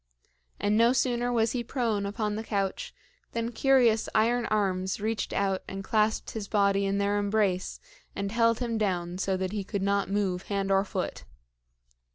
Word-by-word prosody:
And 205 +1 +1
no 235 +2 +5
sooner 245 -1 +1
was 230 -2 +2
he 245 -2 -2
prone 230 -5 -1
upon 210 0 -2
the 220 - -4
couch 195 -3 -2 0.4
than 230 0 -2
curious 240 -3 +3
iron 235 +2 +2
arms 190 -3 0
reached 220 +1 -2
out 195 -1 0
and 195 0 -6
clasped 215 +2 +1
his 215 -3 -5
body 200 -1 +2
in 195 0 0
their 200 +1 +1
embrace 205 -3 0 0.4
and 200 0 -3
held 230 0 +3
him 230 -2 -1
down 180 -3 -1
so 190 0 0
that 185 0 -2
he 205 -1 -3
could 200 0 -3
not 200 0 +1
move 195 -3 -1
hand 195 -1 -1
or 195 0 +4
foot. - - -4
205 Hz, 175 wpm, -28 LUFS, 195-230 Hz, 0.4 s, no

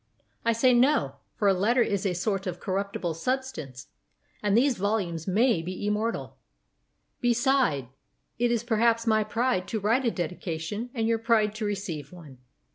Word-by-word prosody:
I 230 - +3
say 250 +3 +4
no; 240 - +3 0.2
for 205 - +1
a 195 - +6
letter 230 +7 +3
is 200 -1 -1
a 180 - -1
sort 195 +2 -1
of 175 -1 -4
corruptible 190 -3 -2
substance, 165 - -4 0.5
and 205 0 +2
these 260 +1 +3
volumes 185 -5 -1
may 215 0 +3
be 180 +2 -6
IMMORTAL. 210 +2 -2 0.8
Beside, 245 - +2 0.5
it 240 0 +2
is 235 -1 0
perhaps 230 0 +2
my 215 -1 +3
pride 215 -3 0
to 220 - -2
write 230 +6 +1
a - - +4
dedication 175 +3 -4
and 225 -2 0
your 230 0 +1
pride 220 -2 +2
to 215 0 -4
receive 195 -7 -4
one. 155 -8 -13
210 Hz, 160 wpm, -27 LUFS, 180-235 Hz, 0.8 s, a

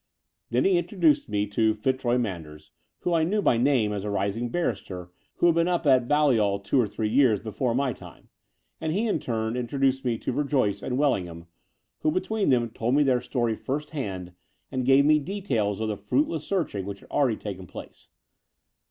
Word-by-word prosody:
Then 120 +2 +1
he 185 -2 +4
introduced 170 - +1
me 105 -1 0
to 110 +1 +1
Fitzroy 125 +1 0
Manders, 80 -10 -5 0.3
whom 175 - 0
I 165 -1 +3
knew 200 +6 +1
by 150 - +3
name 120 -4 +2
as 100 -2 -3
a 105 - -3
rising 100 +4 -1
barrister 90 - -3 0.2
who - - +1
had 170 - +6
been 170 +1 +2
up 175 -2 0
at 130 -3 +4
Balliol 120 -9 +3
two 100 +6 +1
or 115 - 0
three 105 +1 -3
years 115 -2 +3
before 115 +2 -2
my 135 -1 +1
time; - - -14 0.5
and 160 - -2
he 210 +6 0
in 210 - 0
turn 110 -1 -2
introduced 135 +2 0
me 120 -3 0
to - - -3
Verjoyce 135 -6 0
and 125 - -2
Wdlingham, 90 - 0 0.5
who - - +1
between 200 +5 0
them 120 -3 +2
told 115 +3 -1
me 145 - +5
their 130 -3 +2
story 120 -2 -1
first 145 +6 -4
hand 95 - -5 0.4
and 130 -2 -2
gave 135 +1 +6
me 150 0 +5
details 140 - -2
of 110 - -1
the 105 -1 -2
fruitless 165 - -1
searching 145 - -2
which 100 -1 -6
had - - -18
already 125 -7 +2
taken 95 -3 -7
place. - - -11
125 Hz, 195 wpm, -26 LUFS, 105-150 Hz, 0.5 s, had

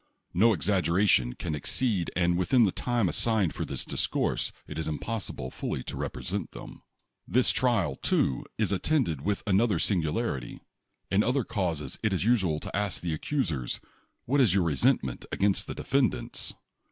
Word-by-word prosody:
No 110 +6 +5
exaggeration 90 - +2
can 80 +3 -4
ex 70 - -1
ceed, 105 -10 +1
and 85 -1 +2
within 90 +8 +4
the 100 - +3
time 120 -2 0
assigned 105 -2 +1
for - - -3
this - - -3
dis - - 0
course - - 0
it 75 - -6
is 80 - -3
impossible 80 - -4
fully 65 - -4
to - - -6
represent 85 +9 -4
them. - - -10 0.5
This 125 +1 +4
trial, 115 - +1
too, 65 - +1
is - - +1
attended 95 - +1
with 100 +6 -1
another 105 -1 +3
singular 95 +5 +1
ity. - - -8 0.5
In 95 +2 +4
other 125 +3 +1
causes 85 - -3
it 110 -2 +1
is 95 - 0
usual 95 -10 +2
to - - -6
ask 105 -2 -1
the 85 -3 -1
accus 130 - -1
ers: 65 -3 -4 0.5
"What 140 +3 +3
is 105 -8 +4
your 95 - +3
resentment 65 -4 +1
against 100 0 +1
the - - -5
de - - -6
fendants - - 0
95 Hz, 175 wpm, -28 LUFS, 80-110 Hz, 0.5 s, No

